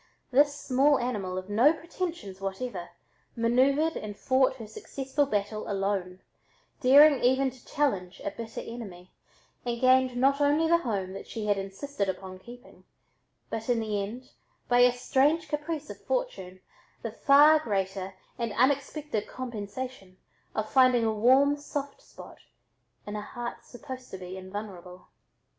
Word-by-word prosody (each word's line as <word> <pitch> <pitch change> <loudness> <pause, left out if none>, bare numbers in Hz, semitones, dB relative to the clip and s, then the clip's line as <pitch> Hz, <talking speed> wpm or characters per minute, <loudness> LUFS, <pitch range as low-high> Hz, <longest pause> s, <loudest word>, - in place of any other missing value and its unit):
This 285 +2 +4
small 280 +2 +3
animal 205 -7 -3
of 185 0 -5
no 235 +9 +4
pretensions 330 - -6
whatever, 195 -2 -4 0.5
manoeuvered 270 +7 +2
and 210 -1 -6
fought 260 0 +2
her 230 -4 -8
successful 270 +6 -2
battle 210 -2 -2
alone, 195 -2 -2 0.6
daring 285 +1 +7
even 260 +2 +3
to 250 -1 -18
challenge 195 -11 -1
a 200 - -1
bitter 225 +2 -7
enemy, 195 -7 -9 0.5
and 235 -1 -3
gained 255 0 +4
not 275 +3 +3
only 295 +3 +3
the 340 +1 +4
home 195 - -3
that 195 - -8
she 220 -2 -5
had 205 -1 +1
insisted 195 +2 -4
upon 185 0 -6
keeping, 245 +5 -14 0.7
but 225 +2 -4
in 240 -2 +3
the 210 -2 -1
end, 245 +7 -7 0.4
by 245 0 +3
a 245 0 +7
strange 285 +6 +1
caprice 300 +1 -4
of - - -11
fortune, 345 - -3 0.4
the - - -3
far 295 +2 +6
greater 195 -6 -3 0.2
and 230 -3 -2
unexpected 280 -2 0
compensation 235 -4 -7 0.4
of 215 0 -1
finding 255 -2 +4
a 220 - +1
warm 260 +6 +4
soft 285 -1 -6
spot - - -13 0.7
in 205 - -6
a 210 - -3
heart 240 +3 -7
supposed 260 0 -9
to 190 - -7
be 185 0 -8
invulnerable. 185 -2 -8
245 Hz, 145 wpm, -28 LUFS, 200-280 Hz, 0.7 s, daring